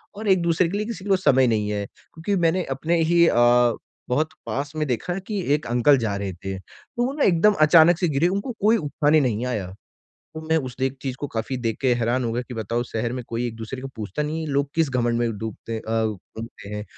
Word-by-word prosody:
और 215 +1 -6
एक-दूसरे 170 -2 +3
के 200 - -2
लिए 210 - -2
किसी 225 -5 -6
को 195 -1 +3
समय 130 -8 +4
नहीं 105 -3 0
है 100 -1 -2
क्योंकि 165 - -5
मैंने 170 +2 +2
अपने 165 +4 +1
ही 170 +1 +4
अ, - - +2 0.7
बहुत 155 +5 +1 0.2
पास 140 +2 -3
में 155 -1 0
देखा 140 - -2
कि 210 -3 -2
एक 150 - -5
अंकल 125 +4 +4
जा 110 -4 -1
रहे 100 -1 -4
थे। 95 +2 -6
तो 240 - -6
वो 265 - -2
ना 290 - 0
एकदम 190 +3 +4
अचानक 160 +2 +7
से 180 - +2
गिरे 150 +3 +2
उनको 200 +7 -2
कोई 220 +3 +4
उठाने 150 -1 +2
नहीं 120 -3 0
आया। 105 -7 -2 0.7
तो - - -4
मैं 160 - +3
उस 130 -4 -6
देख 135 +1 0
चीज़ 130 -2 -3
को 145 - -2
काफ़ी 115 +3 -3
देख 115 -3 -2
के 130 -2 +3
हैरान 120 +2 0
हो 115 - -1
गया 120 +2 -1
कि 125 - -6
बताओ 115 +2 -2
शहर 115 0 -3
में 130 - -4
कोई 115 +1 -2
एक-दूसरे 115 +3 -7
को 135 - -5
पूछता 110 +6 -3
नहीं 155 +2 -3
है 160 - -4
लोग 140 0 +1
किस 160 -4 +2
घमंड 120 -2 +1
में 115 -3 -1
डूबते 110 +1 -6
हैं 110 - -3
अ, 110 0 0
डुबते 110 0 -8
हैं 105 0 -4
130 Hz, 235 wpm, -23 LUFS, 115-165 Hz, 0.7 s, अचानक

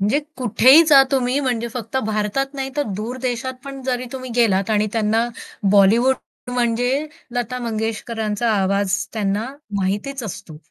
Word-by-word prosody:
म्हणजे 210 +8 +2 0.2
कुठेही 255 +5 +6
जा 285 -3 +8
तुम्ही 260 0 +1
म्हणजे 240 -4 -1
फक्त 235 0 -5
भारतात 215 +5 0
नाही, 270 -1 -3
तर 290 - +2
दूर 225 +5 -4
देशात 255 0 -2
पण 275 -1 -7
जरी 255 -1 -2
तुम्ही 255 -1 -6
गेलात 205 -4 +2
आणि 215 0 +2
त्यांना 225 +1 +1 0.4
बॉलिवूड 215 +6 +5 0.4
म्हणजे 245 +4 +1 0.3
लता 245 +1 -2
मंगेशकरांचा 225 -1 -2
आवाज 200 0 +1 0.2
त्यांना 210 0 -1 0.3
माहितीच 205 +8 -2
असतो. 200 -7 -7
235 Hz, 140 wpm, -21 LUFS, 210-255 Hz, 0.4 s, जा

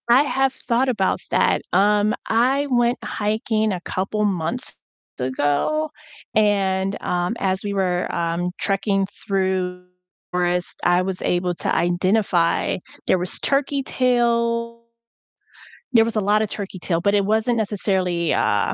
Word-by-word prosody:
I 250 +4 +6
have 270 -2 +1
thought 250 +2 +2
about 205 -6 +1
that. - - +2
Um, 210 +1 +3
I 260 +5 +2
went 240 -1 +2
hiking 215 +1 -1
a 180 -2 -3
couple 195 +4 -2
months 195 +5 -2 0.5
ago 145 - 0 0.5
and, 195 -2 +2
um, 175 +4 -1
as 190 -1 0
we 205 -1 -2
were, 180 -2 0
um, 170 +1 -1
trekking 195 0 0 0.2
through 185 -2 0
the - - -28 0.5
forest, 180 0 -1
I 175 +1 +3
was 185 -1 -4
able 180 0 0
to - - -2
identify 175 0 +1 0.3
there 185 - +3
was 180 +1 -5
turkey 275 0 0
tail 235 -2 +1 1.1
there 225 -2 +7
was 230 0 -2
a - - +2
lotta 210 +2 +2
turkey 200 -2 -6
tail, 170 -1 -1
but 200 +4 +2
it 200 - +3
wasn't 220 +4 +1
necessarily, 190 -5 0
uh, - - +1
200 Hz, 140 wpm, -22 LUFS, 180-230 Hz, 1.1 s, there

